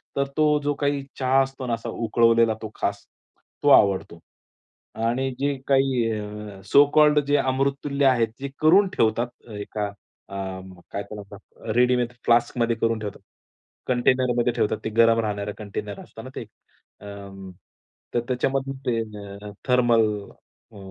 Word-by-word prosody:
तर 140 Hz, -, +1 dB
तो 155 Hz, -, +4 dB, 0.2 s
जो 145 Hz, 0 st, +1 dB
काही 140 Hz, -1 st, 0 dB, 0.2 s
चहा 130 Hz, +1 st, +3 dB
असतो 135 Hz, -1 st, -4 dB
ना 120 Hz, -, 0 dB
असा 115 Hz, -, -4 dB
उकळवलेला 115 Hz, 0 st, +3 dB
तो 110 Hz, -1 st, -6 dB
खास, 100 Hz, 0 st, -3 dB, 0.6 s
तो -, -, +4 dB
आवडतो. 95 Hz, -4 st, +4 dB, 0.9 s
आणि 130 Hz, +3 st, 0 dB
जे 140 Hz, 0 st, +1 dB
काही 135 Hz, -3 st, +3 dB
अ, 105 Hz, -2 st, -6 dB
सो 140 Hz, +8 st, +6 dB
कॉल्ड 150 Hz, -1 st, +6 dB
जे 145 Hz, -, +3 dB
अमृततुल्य 140 Hz, +1 st, 0 dB
आहेत. 125 Hz, -4 st, +4 dB
ते 140 Hz, +1 st, -4 dB
करून 185 Hz, +6 st, +6 dB
ठेवतात 120 Hz, +2 st, 0 dB
एका 105 Hz, 0 st, -3 dB, 0.4 s
अ, 100 Hz, -, -8 dB, 0.6 s
काय 100 Hz, -, -3 dB
त्याला 105 Hz, -1 st, -9 dB
म्हणतात? 100 Hz, +2 st, -13 dB
रेडीमेड 125 Hz, 0 st, +3 dB
फ्लास्कमध्ये 120 Hz, 0 st, +2 dB
करून 115 Hz, -1 st, +1 dB
ठेवतात, 105 Hz, -2 st, -7 dB, 0.7 s
कंटेनरमध्ये 125 Hz, -1 st, +2 dB
ठेवतात. 105 Hz, -, 0 dB
ते -, -, 0 dB
गरम 115 Hz, 0 st, +5 dB
राहणारं 105 Hz, -2 st, -2 dB
कंटेनर 105 Hz, -1 st, -6 dB
असतं -, -, -12 dB
ना -, -, -8 dB
ते. -, -, -4 dB, 0.6 s
अ, -, -, -12 dB, 1.1 s
तर -, -, +2 dB
त्याच्यामधून 135 Hz, +2 st, -1 dB
ते 115 Hz, -2 st, +1 dB
अ, 105 Hz, -1 st, -9 dB, 0.2 s
थर्मल 120 Hz, -3 st, +4 dB, 0.7 s
अ, -, -, -12 dB
120 Hz, 145 wpm, -24 LUFS, 105-135 Hz, 1.1 s, सो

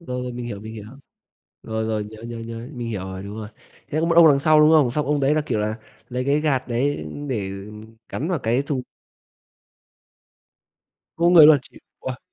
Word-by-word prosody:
Rồi, 125 Hz, -6 st, -5 dB
rồi, 125 Hz, -1 st, -5 dB
mình 120 Hz, 0 st, -6 dB
hiểu, 100 Hz, -4 st, -6 dB
mình 110 Hz, +1 st, -9 dB
hiểu. 105 Hz, -2 st, -8 dB, 0.8 s
Rồi, 110 Hz, 0 st, -3 dB
rồi, 110 Hz, -1 st, -2 dB
nhớ, 110 Hz, +1 st, -12 dB
nhớ, 115 Hz, 0 st, -7 dB
nhớ, 115 Hz, 0 st, -7 dB
mình 120 Hz, -2 st, -5 dB
hiểu 105 Hz, -4 st, -3 dB
rồi, 95 Hz, 0 st, -7 dB
đúng 100 Hz, +2 st, -8 dB
rồi, 105 Hz, -1 st, -6 dB, 0.4 s
thế 155 Hz, -, -1 dB
có 165 Hz, -, +1 dB
một 165 Hz, -, +2 dB
ông 170 Hz, -2 st, +9 dB
đằng 140 Hz, -2 st, +5 dB
sau, 155 Hz, +2 st, +4 dB
đúng 150 Hz, +1 st, +6 dB
không? 150 Hz, -6 st, +5 dB
Xong 150 Hz, +4 st, -2 dB
ông 145 Hz, -1 st, +1 dB
đấy 140 Hz, +2 st, +3 dB
là, 155 Hz, -, +2 dB
kiểu 105 Hz, -, -1 dB
là, 110 Hz, +1 st, -2 dB, 0.3 s
lấy 125 Hz, 0 st, -3 dB
cái 145 Hz, +2 st, +2 dB
gạt 140 Hz, -5 st, 0 dB
đấy 120 Hz, -, -1 dB, 0.2 s
để 105 Hz, -7 st, -2 dB, 0.6 s
gắn 155 Hz, -, -4 dB
vào 180 Hz, -3 st, 0 dB
cái 120 Hz, +2 st, 0 dB
thùng. 140 Hz, -3 st, -3 dB, 2.3 s
Không 170 Hz, -, -1 dB
có 175 Hz, -, +5 dB
người 160 Hz, -4 st, +9 dB
luôn, 155 Hz, -2 st, +7 dB
chịu. -, -, -15 dB, 0.2 s
Wow! 130 Hz, -1 st, -5 dB
125 Hz, 220 wpm, -22 LUFS, 110-150 Hz, 2.3 s, ông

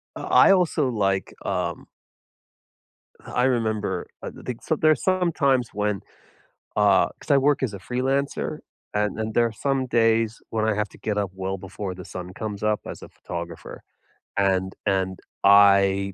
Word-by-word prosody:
I -, -, +5 dB
also 165 Hz, -7 st, +2 dB
like 95 Hz, -4 st, 0 dB
um -, -, -2 dB, 1.4 s
Uh, -, -, -9 dB
I 125 Hz, -, +1 dB
remember, 110 Hz, -7 st, 0 dB
I -, -, -5 dB
th -, -, -14 dB
think 125 Hz, -2 st, -5 dB
so 155 Hz, -, 0 dB
there's 155 Hz, -2 st, +2 dB
some 185 Hz, -2 st, +2 dB
times 135 Hz, -7 st, +2 dB
when, 105 Hz, -1 st, -1 dB, 0.8 s
uh, 105 Hz, -2 st, +4 dB
'cause -, -, -15 dB
I 140 Hz, -, +6 dB
work 145 Hz, 0 st, +2 dB
as 110 Hz, -6 st, -1 dB
a -, -, -6 dB
freelancer, 130 Hz, +7 st, -2 dB, 0.3 s
and 105 Hz, 0 st, 0 dB
and 110 Hz, 0 st, -3 dB
there 120 Hz, 0 st, +4 dB
are 115 Hz, -, -4 dB
some 135 Hz, +3 st, -1 dB
days 115 Hz, -1 st, +2 dB
when 110 Hz, -1 st, 0 dB
I 110 Hz, -, +2 dB
have 105 Hz, -1 st, -1 dB
to -, -, -16 dB
get 105 Hz, -1 st, -2 dB
up 100 Hz, -3 st, -1 dB
well 95 Hz, 0 st, -3 dB
before 95 Hz, 0 st, -6 dB
the 90 Hz, -1 st, -9 dB
sun 90 Hz, +1 st, -7 dB
comes 105 Hz, -2 st, -5 dB
up 105 Hz, 0 st, +1 dB
as -, -, -8 dB
a -, -, -9 dB
photographer, 85 Hz, -1 st, -8 dB, 0.6 s
and 95 Hz, -1 st, +1 dB
and 95 Hz, -2 st, 0 dB, 0.2 s
I 100 Hz, -1 st, +5 dB
105 Hz, 170 wpm, -24 LUFS, 95-125 Hz, 1.4 s, I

